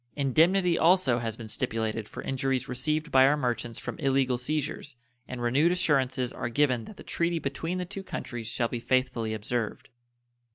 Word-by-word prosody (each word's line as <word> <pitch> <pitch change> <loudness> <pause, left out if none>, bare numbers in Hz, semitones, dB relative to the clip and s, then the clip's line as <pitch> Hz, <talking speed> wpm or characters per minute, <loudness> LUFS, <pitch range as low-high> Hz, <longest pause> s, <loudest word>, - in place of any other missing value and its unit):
Indemnity 170 +6 +3
also 165 -8 +4
has 115 -2 -3
been 115 - -8
stipulated 110 0 -2
for - - -7
injuries 135 -1 -1
received 150 +5 -2
by 130 0 +7
our 150 +2 +3
merchants 120 -4 -2
from - - -6
illegal 135 -3 +2
seizures, 145 +1 -3 0.3
and 125 -1 -5
renewed 140 +8 +3
assurances 135 -8 +1
are - - -3
given 125 -2 +1
that 210 - -12
the - - -10
treaty 170 0 0
between 165 +4 -3
the 180 - -2
two 195 +2 -7
countries 120 - -6
shall 115 +1 0
be 120 - -4
faithfully 125 -2 0
observed. 110 +1 -3
130 Hz, 170 wpm, -28 LUFS, 120-155 Hz, 0.3 s, by